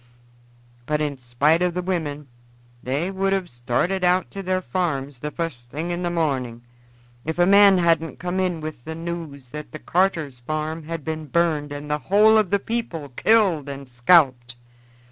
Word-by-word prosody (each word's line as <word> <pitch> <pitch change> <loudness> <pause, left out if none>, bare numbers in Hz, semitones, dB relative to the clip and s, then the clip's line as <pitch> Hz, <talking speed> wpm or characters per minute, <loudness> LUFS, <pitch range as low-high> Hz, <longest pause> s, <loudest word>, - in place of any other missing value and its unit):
But 150 0 0
in 145 -3 -2
spite 135 +7 +2
of 180 -1 +1
the 180 - -2
women 150 -6 -3 0.5
they 145 +9 -2
would 195 0 0
have 190 -2 -1
started 125 +11 -1
out 180 +1 +2
to 195 - -6
their 185 0 0
farms 145 -9 -2
the 150 - -4
fust 150 -8 -5
thing 160 +7 -4
in 175 +1 -2
the 175 - -1
morning, 130 -8 -1 0.6
if 160 +1 -3
a 175 - +4
man 200 0 +7
hadn't 165 -2 +1
come 180 +1 -3
in 180 -3 -1
with 155 -6 -7
the 160 +3 -6
news 160 -6 -6
that 150 0 -8
Carter's 165 -8 0
farm 155 +4 -4
had 165 -2 -5
been 160 -1 -4
burned 155 -1 +1
and 145 0 -6
the 150 0 -1
whole 210 +8 +5
of 210 -4 0
the 200 - +3
people 200 -9 -4
killed 175 - +2
and 140 -1 -7
scalped. 125 -2 +3
160 Hz, 175 wpm, -23 LUFS, 145-180 Hz, 0.6 s, man